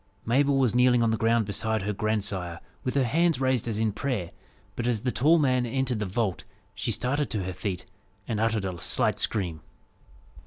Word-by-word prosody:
Mabel 135 +4 +3
was 130 -5 +3
kneeling 125 -1 +4
on 115 - +2
the - - +2
ground 115 0 +2
beside 110 +1 -1
her 105 +1 -1
grandsire, 100 -5 -2 0.2
with 125 - -2
her 140 - +4
hands 165 +4 +2
raised 130 -3 +1
as 110 -3 -1
in 110 -1 +1
prayer, 105 -7 -3 0.4
but 120 - -2
as 115 -4 0
the 125 - +1
tall 155 +8 +4
man 130 -5 +2
entered 125 -1 -1
the 105 - -2
vault, 100 -1 -1 0.3
she - - -2
started 145 +3 0
to 105 -5 -2
her 95 0 -4
feet, 95 -1 -4 0.4
and 110 -3 -1
uttered 110 -2 +1
a 90 -3 -4
slight - - 0
scream. 85 -7 -1
115 Hz, 195 wpm, -27 LUFS, 100-130 Hz, 0.4 s, kneeling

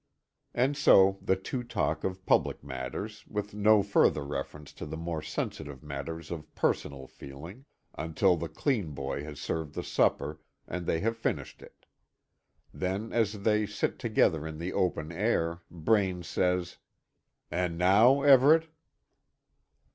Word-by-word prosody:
And 130 +4 +2
so 95 -8 +5
the 95 - +2
two 110 +7 -4
talk 120 - -2
on - - +2
of 95 0 -12
public - - +2
matters, 70 - -6
with 105 -1 -4
no 105 0 +4
further 100 -7 +3
reference 70 +1 -6
to - - -8
the 80 - -5
more 85 -1 -3
sensitive 75 -3 -5
matters 75 +3 -6
of 80 -3 -7
personal 70 -2 -1
feeling, 80 - -11 0.3
until 80 +4 +2
the 85 -1 -5
clean 100 - -1
boy 70 +1 -4
has 75 -1 -8
served 75 0 -4
the - - -3
supper, 75 +2 +1 0.3
and 90 0 -5
they 80 - +1
have 115 +1 0
finished 115 - -3
it. - - -16 0.9
Then, 95 +4 -3
as 105 -3 0
they 105 -1 +2
sit 105 - -2
together 80 -9 +2
in 80 -1 -7
the 85 +3 -4
open 85 -3 -1
air, 85 -3 0
Braine 90 +1 +1
says: 90 +1 -1 0.7
"And 90 -1 -1
now, 110 +10 +5
Everet?" 145 +4 +6
90 Hz, 145 wpm, -29 LUFS, 75-105 Hz, 0.9 s, Everet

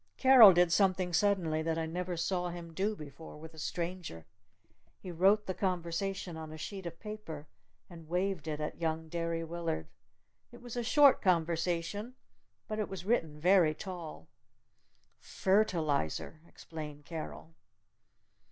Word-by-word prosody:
Carol 260 -6 +9
did 175 -1 +3
something 185 -1 +2
suddenly 175 -4 +2
that 160 0 -1
I 165 - -1
never 175 +2 -4
saw 180 +1 -1
him 170 -1 -8
do 200 +5 -1
before 150 -1 -10
with 160 +1 -11
a 160 - -12
stranger. 170 - -4 0.7
He 185 - -8
wrote 195 +5 +3
a 185 - -1
conversation 180 0 -2
on 160 -1 -7
a 155 - -8
sheet 190 +3 -6
of 170 0 -8
paper 210 -9 -7 0.4
and 165 -3 -13
waved 180 -2 -1
it 150 -1 -3
at 150 +2 -5
young 160 0 -2
Derry 165 0 -2
Willard. 165 - -3 0.7
It 240 - -13
was 245 -1 -9
a 240 - -1
short 280 +3 +5
conversation. 175 +5 0 0.5
But 215 0 -3
it 215 - -2
was 185 -2 -7
written 165 -9 0
very 175 -2 +4
tall. 170 - -8 0.9
"Phertalizer!" 160 - 0
explained 150 -2 -9
Carol. 165 0 -7
170 Hz, 145 wpm, -32 LUFS, 160-195 Hz, 0.9 s, Carol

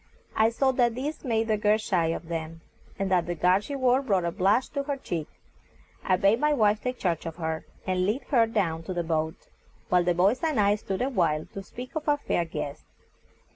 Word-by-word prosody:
I 220 +1 +4
saw 265 +3 +2
that 240 -3 +2
this 285 +5 -4
made 225 -4 0
the 215 -1 +2
girl 210 0 +3
shy 185 -6 0
of 165 0 -3
them, 165 -1 -5 0.4
and 195 -1 -2
that 175 -2 +2
the 175 - -2
garb 180 +4 +3
she 280 +6 -6
wore 260 0 +3
brought 195 -9 +1
a 170 - 0
blush 200 +7 +2
to 280 - -2
her 280 0 -3
cheek. 170 - -4 0.8
I 185 - +3
bade 200 +5 +3
my 300 +1 +3
wife 215 -5 +2
take 250 0 -3
charge 170 -3 -1
of 165 - -6
her, 160 -2 -3 0.2
and 185 0 0
lead 230 +7 -1
her 235 -4 +4
down 180 -8 -1
to 185 - -4
the 175 - 0
boat, 160 -1 -1 0.5
while 180 -1 +4
the 175 0 +1
boys 200 +8 +3
and 310 -7 +1
I 205 0 +4
stood 200 +1 -3
a 265 - 0
while 160 - +1
to 195 - -5
speak 250 +6 -9
of 310 -1 -2
our 290 - +4
fair 175 -11 -1
guest. 145 -3 -6
200 Hz, 225 wpm, -27 LUFS, 170-250 Hz, 0.8 s, I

